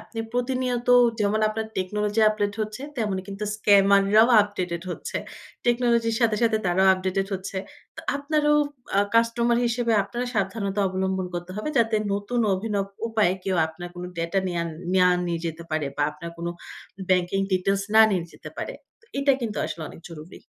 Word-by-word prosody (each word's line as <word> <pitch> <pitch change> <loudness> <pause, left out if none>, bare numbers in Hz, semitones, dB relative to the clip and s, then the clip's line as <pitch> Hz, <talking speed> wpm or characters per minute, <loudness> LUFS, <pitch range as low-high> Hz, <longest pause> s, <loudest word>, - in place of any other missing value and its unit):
আপনি 225 +1 -11
প্রতিনিয়ত 245 -1 -1 0.3
যেমন 210 +1 +1
আপনার 220 0 -3
টেকনোলজি 210 +3 -1
আপডেট 205 -1 -1
হচ্ছে, 215 +4 -4
তেমনি 205 -5 -1
কিন্তু 200 +1 -5
স্ক্যামাররাও 200 +2 +5
আপডেটেড 180 -4 -4
হচ্ছে। - - -5 0.5
টেকনোলজির 235 -2 +2
সাথে, 225 -2 +3
সাথে 225 -1 +3
তারাও 185 +2 +3
আপডেটেড 190 +1 -1
হচ্ছে। 190 +1 -6 0.4
তো - - -6 0.2
আপনারও 295 +1 +1 0.4
আ - - +4 0.2
কাস্টমার 235 +1 +3
হিসেবে 235 -1 0
আপনারও 240 +5 -4
সাবধানতা 200 0 -1
অবলম্বন 190 0 -1
করতে 175 +1 -5
হবে, 215 - -3
যাতে 225 -1 +3 0.2
নতুন 205 +4 -1
অভিনব 200 0 -2 0.2
উপায়ে 215 -5 +2
কেউ 190 -2 0
আপনার 175 +2 -8
কোনো 180 0 -6
ডেটা 170 +4 0
নেয়া 170 -1 -1 0.3
নেয়ার 180 -1 +4
নিয়ে 170 -1 -1
যেতে 165 +1 -5
পারে 155 -2 -1
বা - - +1
আপনার 150 +3 -8
কোনো 170 0 -3 0.6
ব্যাংকিং 185 +1 +2
ডিটেইলস 195 +2 +1
না 220 - +8
নিয়ে 185 -4 0
যেতে - - -10
না - - -26
পারে। - - -4 0.3
তো - - -26
এটা 280 0 +4
কিন্তু 220 -3 -3
আসলে 165 - -6
অনেক - - -12
জরুরি। 165 +1 -11
200 Hz, 165 wpm, -25 LUFS, 185-230 Hz, 0.6 s, না